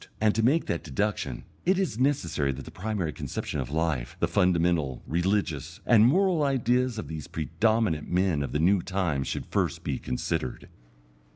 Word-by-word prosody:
And 110 -1 +3
to 115 - +1
make 140 +9 +3
that 85 - -2
deduction, 85 - -2 0.2
it 185 +2 +3
is 185 - -1
necessary 85 - +1
that 65 0 -8
the - - -10
primary 95 -5 -3
conception - - -4
of 65 - -3
life, 80 -5 -1
the - - +2
fundamental, 85 -7 +1
religious, 85 -4 -1
and 115 -1 +6
moral 180 +3 +3
ideas 125 -3 +1
of 110 - -5
these 80 -2 -6
predominant 85 +1 0
men 90 -4 +1
of 70 -3 -3
the - - 0
new 90 +4 +4
time 85 -7 -1
should - - -4
first - - -1
be 65 - -2
considered. 65 0 -3
90 Hz, 170 wpm, -27 LUFS, 75-115 Hz, 0.2 s, and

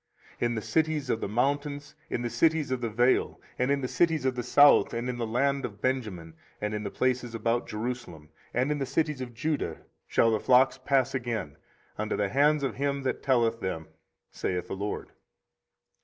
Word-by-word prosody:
24:033:013 - - +1
In 120 - -2
the 110 - -2
cities 155 -2 0
of 110 - -1
the - - -1
mountains, 145 +6 -1
in - - -2
the 120 - -1
cities 160 -4 +2
of 130 -1 -1
the 115 - -1
vale, 120 +4 +2 0.2
and 125 +2 +1
in 140 0 +2
the 130 - -1
cities 160 -1 +1
of 130 - +2
the 125 - -2
south, 145 +2 +5
and 120 +1 -2
in 125 -1 -3
the 115 - -1
land 140 +4 +1
of 100 -4 -6
Benjamin, 105 -11 -2 0.3
and 105 0 -2
in 105 - -2
the 105 - -3
places 125 0 -1
about 115 +2 0
Jerusalem, 105 -9 -5 0.2
and 130 +4 +1
in 150 - -1
the 135 - -1
cities 150 -3 0
of 120 -2 -6
Judah, 150 +4 -2 0.3
shall 115 - +3
the 110 - +1
flocks 130 +3 +4
pass 135 -1 +2
again 120 - -3 0.4
under 110 0 -1
the 100 -1 0
hands 145 +3 +3
of 130 -4 -2
him 140 0 -1
that 130 - -2
telleth 115 -4 +2
them, 80 -4 -4 0.4
saith 90 -1 -2
the - - -5
LORD. 100 +2 -4
125 Hz, 200 wpm, -28 LUFS, 110-140 Hz, 0.4 s, south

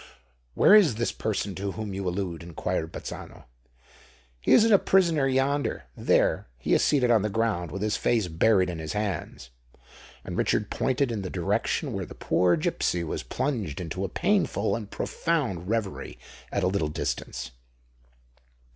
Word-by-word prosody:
"Where - - +6
is 195 - +6
this 120 +1 -1
person 105 -2 -2
to 95 +1 -4
whom 110 -3 -5
you 95 -1 -2
allude?" 90 -2 -3
inquired 80 -1 -3
Bazzano. - - -8 1.0
"He - - -1
is - - +8
a 215 -4 +6
prisoner 170 -7 +3
yonder. 135 +2 0
There—he - - +1
is - - +4
seated 130 -5 +3
on 115 -3 +5
the 105 - -1
ground, 100 -5 -1
with 95 +2 -4
his 105 -1 0
face 110 -6 +1
buried 95 +3 +3
in 85 - -6
his 80 +3 -4
hands!" 100 - -4 0.7
And - - -5
Richard - - 0
pointed 130 -1 0
in 110 -3 -2
the 95 - -5
direction 90 -2 -1
where - - -4
the - - -11
poor 90 -1 +2
gipsy 85 +2 -1
was 80 - -3
plunged 105 - -3
into 90 +2 -4
a 95 - -2
painful 195 - +1
and 110 -3 -6
profound 120 - -2
reverie 110 -4 -3 0.3
at 100 - -1
a - - +3
little 95 -5 0
distance. 75 - -4
100 Hz, 160 wpm, -27 LUFS, 90-120 Hz, 1.0 s, is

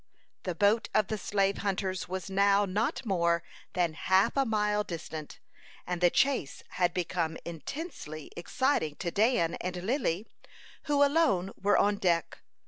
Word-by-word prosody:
The 180 -2 -2
boat 205 +5 +2
of 215 -2 +3
the 215 - -1
slave 195 0 0
hunters 190 -2 -2
was 185 0 -4
now 200 +1 +3
not 210 +6 -1
more 170 -4 +1 0.3
than 175 -3 +1
half 190 +4 +2
a 275 -1 +3
mile 210 -1 +1
distant, 160 -4 -7 0.5
and 180 -1 -3
the 175 - +6
chase 265 - 0
had 175 -1 +1
become 170 -2 -2
intensely 165 - -7
exciting 175 - 0
to 170 +1 -3
Dan 210 -5 +2
and 180 0 -3
Lily, 220 - 0 0.6
who 290 -2 +3
alone 225 - +2
were 205 +1 +2
on 205 0 +3
deck. 170 -4 0
190 Hz, 145 wpm, -30 LUFS, 170-210 Hz, 0.6 s, the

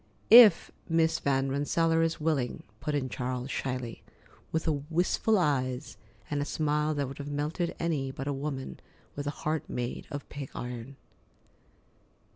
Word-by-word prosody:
"If 225 -6 +9 0.2
Miss 165 0 +2
Van 135 -1 +1
Rensselaer 165 +4 +2
is 165 +1 0
willing," 150 -6 -1 0.2
put 150 - -2
in 135 -2 0
Charles 125 +1 -3
shyly, 125 -3 -3 0.5
with 160 +1 -1 0.2
wistful 180 +6 +2
eyes 135 -5 0 0.3
and 145 -1 -1
a - - +1
smile 150 +1 0
that 140 -2 -1
would 135 +2 -9
have 145 0 -5
melted 150 +4 -2
any 150 -5 -1
but 135 +1 -6
a 145 - 0
woman 135 -1 -4 0.4
with 145 0 -4
a 145 - -6
heart 155 -1 -1
made 120 0 -4
of 145 -3 -6
pig 140 -2 -7
iron. 125 +2 -6
145 Hz, 150 wpm, -29 LUFS, 135-160 Hz, 0.5 s, If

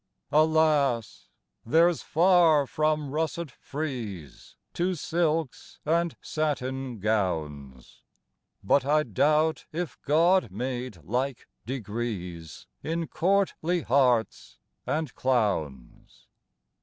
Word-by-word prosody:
Alas! 150 -6 +2 0.3
there's 165 +7 +3
far 165 -3 +4
from 155 0 -1
russet 160 0 -2
frieze 115 - -7 0.2
To 180 +2 0
silks 160 -3 -2
and 170 +1 +1
satin 135 -5 -2
gowns, 75 - -3 0.6
But 125 +7 +3
I 150 +2 +2
doubt 155 +6 +1
if 165 -6 -4
God 170 - +3
made 120 - -5
like 125 - -2 0.2
degrees 105 - -5 0.2
In 165 +1 -2
courtly 180 -2 +1
hearts 125 -3 +1 0.3
and 155 -3 -2
clowns. 100 - -2
140 Hz, 85 wpm, -27 LUFS, 110-160 Hz, 0.6 s, far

